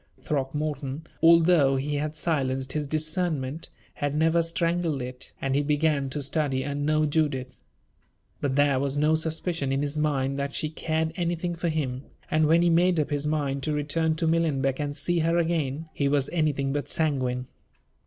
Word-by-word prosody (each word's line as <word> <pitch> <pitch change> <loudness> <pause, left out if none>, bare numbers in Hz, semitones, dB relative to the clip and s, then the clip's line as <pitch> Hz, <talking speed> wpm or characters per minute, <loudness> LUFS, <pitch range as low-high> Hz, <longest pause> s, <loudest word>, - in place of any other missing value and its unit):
Throckmorton, 145 +1 -3 0.2
although 165 -4 +5
he 140 +2 -2
had 150 +1 -2
silenced 135 -5 -1
his 150 -2 -2
discernment, 155 -1 -1 0.2
had 145 0 -2
never 160 +2 +3
strangled 165 -2 0
it, 125 +1 -6
and 135 -1 -1
he 140 - +2
began 145 -1 +1
to 145 +2 -3
study 135 -2 0
and 145 +1 -2
know 155 0 +3
Judith. 145 -4 -1 0.8
But 135 -2 -1
there 145 -2 +3
was 140 +1 -1
no 150 +2 +3
suspicion 160 -2 -1
in 135 +1 0
his 145 +1 -2
mind 140 -3 0
that 140 0 -3
she 155 - -1
cared 160 0 -1
anything 175 0 -1
for 170 0 -2
him; 135 -5 -2 0.3
and, 155 0 +3
when 165 +2 +4
he 175 - +4
made 175 0 +3
up 150 - -1
his 145 0 -1
mind 145 -3 -1
to 150 +2 -1
return 155 +2 0
to 160 - -1
Millenbeck 150 -5 +1
and 145 0 -2
see 175 +4 +2
her 165 +1 +2
again, 160 -3 -1
he 140 - 0
was 140 -1 +1
anything 145 -5 0
but 145 0 -3
sanguine. 130 -5 0
150 Hz, 175 wpm, -26 LUFS, 140-160 Hz, 0.8 s, although